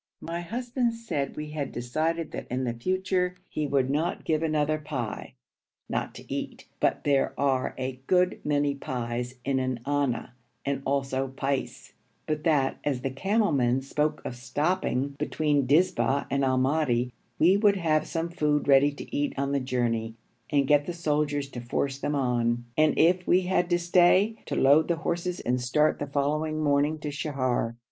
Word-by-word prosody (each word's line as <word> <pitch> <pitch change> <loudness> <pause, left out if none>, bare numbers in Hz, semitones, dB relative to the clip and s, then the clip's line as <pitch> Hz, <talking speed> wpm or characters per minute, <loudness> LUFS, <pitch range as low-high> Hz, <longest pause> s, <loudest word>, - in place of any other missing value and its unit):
My 170 +1 -4
husband 240 +4 -1
said 150 -12 -3
we 150 0 -5
had 145 -3 -3
decided 155 +7 -2
that - - -6
in 130 +1 -1
future 185 +3 0
he 150 -1 -2
would 135 -2 +2
not 160 +5 -1
give 155 -1 +1
another 155 -1 +1
pi 140 -7 -5 0.5
(not - - -3
to - - -8
eat, - - -5
but - - +1
there 140 -2 +1
are 135 -2 +1
a 130 0 -4
good 180 0 +2
many 145 -1 +1
pies 125 -2 -4
in 135 -1 +1
an 130 -2 -2
anna 140 -5 -1 0.3
and 140 -1 -1
also 135 -1 0
pice), 135 +1 -3 0.3
but 155 -1 -2
that, 145 -5 +2
as 135 -4 -1
the 135 - -2
camel 200 - +1
men 125 -2 +2
spoke 150 +2 -1
of 125 - -4
stopping 140 +3 -1
between 150 -2 +1
Dizba 150 -2 +2
and 140 0 +1
Al 130 -1 +2
Madi, 130 -3 +1 0.2
we 175 +5 +5
would 200 -1 +4
have 155 -3 +1
some 165 0 -2
food 150 -3 0
ready 140 +1 +6
to 145 - -8
eat 145 0 0
on 140 0 -1
the 140 - +1
journey 120 -3 -1 0.3
and 140 -2 +2
get 145 0 +3
the 175 - -2
soldiers 150 -3 0
to 125 -3 -7
force 135 +3 -2
them 145 +1 -1
on; 120 -3 0
and, 155 -1 +3
if 180 +2 +3
we 180 - +5
had 180 -1 0
to 175 - +3
stay, 180 +5 +4
to - - -2
load 145 +4 +5
the 170 - +1
horses 175 +2 -2
and 125 +1 0
start 150 +5 +2
the 145 - -3
following 150 +3 -1
morning 145 +1 +2
to 150 -1 -5
Sheher. 130 -5 -1
145 Hz, 175 wpm, -27 LUFS, 130-165 Hz, 0.5 s, ready